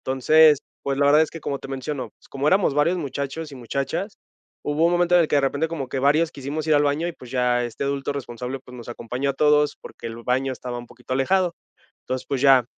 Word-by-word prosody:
Entonces, 150 +3 +5 0.2
pues, 135 -1 -1
la 140 - +2
verdad 145 +2 +6
es 160 - +2
que 165 - -8
como 140 -1 -3
te - - -10
menciono, 135 +1 -4 0.2
como 140 +2 0
éramos 190 -5 +3
varios 150 +5 +2
muchachos 140 0 -4
y - - -7
muchachas, 140 - -3 0.5
hubo 150 +3 +1
un 175 - +2
momento 175 0 +3
en 175 - +7
el 155 - -1
que 145 - +2
de - - +5
repente 140 +4 0
como 145 -6 -4
que 135 - -3
varios 155 +4 +3
quisimos 145 +3 -4
ir 155 - +4
al 145 - +4
baño 145 +4 +1
y, 175 - -3
pues 125 -6 -13
ya, 125 -1 +1
este 120 +3 -4
adulto 140 0 -1
responsable, 125 -1 -5
pues, 125 -1 -13
nos 120 -1 -10
acompañó 125 +3 -3
a - - -1
todos 150 +1 +3
porque - - -10
el 115 - -7
baño 130 +2 +1
estaba 125 -1 -6
un 120 - -9
poquito 125 +2 -6
alejado. 175 +6 +2 0.5
Entonces, 130 0 -4
pues 135 -2 -2
ya, 135 -3 +6
140 Hz, 240 wpm, -23 LUFS, 130-155 Hz, 0.5 s, en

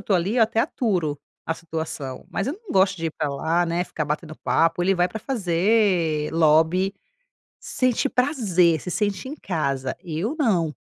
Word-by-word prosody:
estou 200 -1 +1
ali, 190 +7 -1
eu - - +6
até 225 0 +1
aturo 180 - 0 0.3
a 165 - 0
situação, 160 -5 -6
mas 200 - -2
eu 280 - -1
não 440 - -8
gosto 190 0 +3
de 165 -1 -3
ir - - -2
para 150 -2 -1
lá, 160 +5 0
né, 170 +1 0
ficar 155 - -4
batendo 155 +1 -4
papo. 165 +1 +2
Ele 195 +2 +3
vai 175 0 +3
para 220 - -6
fazer 180 - +1
lobby, 165 +4 +3 0.7
sente 255 +1 0
prazer, 205 - +2
se 180 - -6
sente 205 +4 -1
em 285 - -5
casa. 140 - -2
Eu 180 - -3
não, 175 - +1
175 Hz, 175 wpm, -23 LUFS, 160-205 Hz, 0.7 s, eu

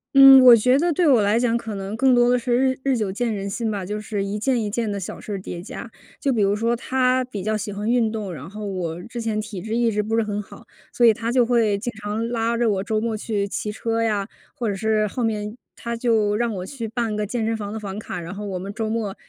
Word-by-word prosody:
嗯， 270 -1 +10
我 245 -2 +10
觉 250 +4 +3
得 345 +1 +2
对 335 +1 +2
我 250 -6 +5
来 205 +2 +2
讲 235 -1 +2
可 225 -3 -3
能 195 +2 -5
更 260 +1 +4
多 245 0 +4
的 250 - +3
是 240 +1 -3 0.2
日 260 - -7
日 270 -3 +1
久 205 -4 -1
见 230 +3 -1
人 200 -1 -3
心 220 +2 -2
吧， 200 -3 -3
就 210 +2 -4
是 205 -2 -3
一 205 +1 -3
件 255 +1 +1
一 - - -2
件 215 0 -2
的 200 - -3
小 180 - -7
事 210 - -6
儿 195 - -3
叠 175 -2 -7
加。 225 +3 -8 0.3
就 275 -2 +1
比 220 - +1
如 200 +1 +3
说 230 +2 +1
她 255 +1 +1
比 205 -7 -6
较 215 +1 0
喜 210 0 -3
欢 205 +2 -4
运 235 -2 +2
动， 210 -5 -4
然 150 +3 -8
后 210 +1 -7
我 180 -3 -4
之 235 0 -6
前 220 -1 -1
体 210 -4 -6
质 220 +1 -3
一 235 -1 +2
直 210 0 0
不 220 +2 -1
是 225 - +3
很 210 -1 -3
好， - - -14 0.3
所 240 - +3
以 225 - +7
她 230 +2 -3
就 250 -2 +4
会 225 -4 +2
经 240 +3 -4
常 215 +3 -2
拉 230 0 0
着 240 -1 +2
我 195 -1 -1
周 215 0 0
末 225 0 -2
去 205 -2 -2
骑 210 +1 -3
车 230 +1 -2
呀， 210 -3 0 0.3
或 235 - -3
者 205 - 0
是 215 +1 +1
后 235 +4 -3
面 210 0 -2 0.2
她 235 0 -4
就 220 -3 +1
让 230 -2 -1
我 180 0 -5
去 230 -1 -6
办 225 -1 -2
个 210 -1 -2
健 225 0 -2
身 225 0 0
房 205 -2 -5
的 220 - -4
房 200 0 -6
卡， 180 -4 -6
然 170 +2 -7
后 205 0 -6
我 185 -2 -3
们 195 +2 -6
周 220 0 -3
末 220 -3 -2
220 Hz, 300 characters per minute, -23 LUFS, 205-235 Hz, 0.3 s, 嗯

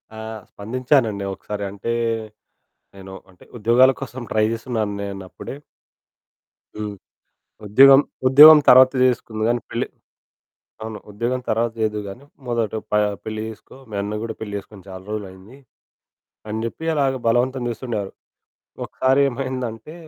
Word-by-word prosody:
ఆ! - - -10 0.3
స్పందించానండి 115 -1 0
ఒకసారి. 105 +1 -6
అంటే 100 +3 -4 1.0
నేను 95 -1 -11 0.2
అంటే 90 - -20
ఉద్యోగాల 120 +4 +5
కోసం 130 -1 -6
ట్రై 110 0 +2
జేస్తున్నాను 115 -2 -3
నేనప్పుడే. 100 +3 -7 1.2
హ్మ్. 105 -1 -5 0.7
"ఉద్యోగం, 135 +6 +7 0.3
ఉద్యోగం 150 +4 +10
తర్వాత 130 +1 +8
చేసుకుందువు 115 -3 0
గాని 120 0 0
పెళ్లి" - - -2 1.0
అవును. 110 -1 -6
"ఉద్యోగం 120 +5 -2
తర్వాత 115 +1 0
చేద్దువు 105 -1 -1
గాని 120 +8 -10 0.2
మొదట 115 -3 -1 0.2
ప - - -28 0.3
పెళ్లి 110 0 -4
చేసుకో. 110 +3 -12
మీ - - -8
అన్న 105 +1 -4
గూడా 115 -1 -4
పెళ్లి 105 -2 -6
చేసుకొని 100 -1 -13
చాలా 95 0 -9
రోజులయింది" 100 +3 -8 0.9
అని 110 +1 -3
జెప్పి 140 +7 -6
అలాగా 135 -2 +1
బలవంతం 125 +2 +1
జేస్తుండేవారు. 115 -4 -4 0.7
ఒకసారి 130 +2 +1
ఏమైందంటే 130 +1 -5
115 Hz, 125 wpm, -21 LUFS, 105-130 Hz, 1.2 s, ఉద్యోగం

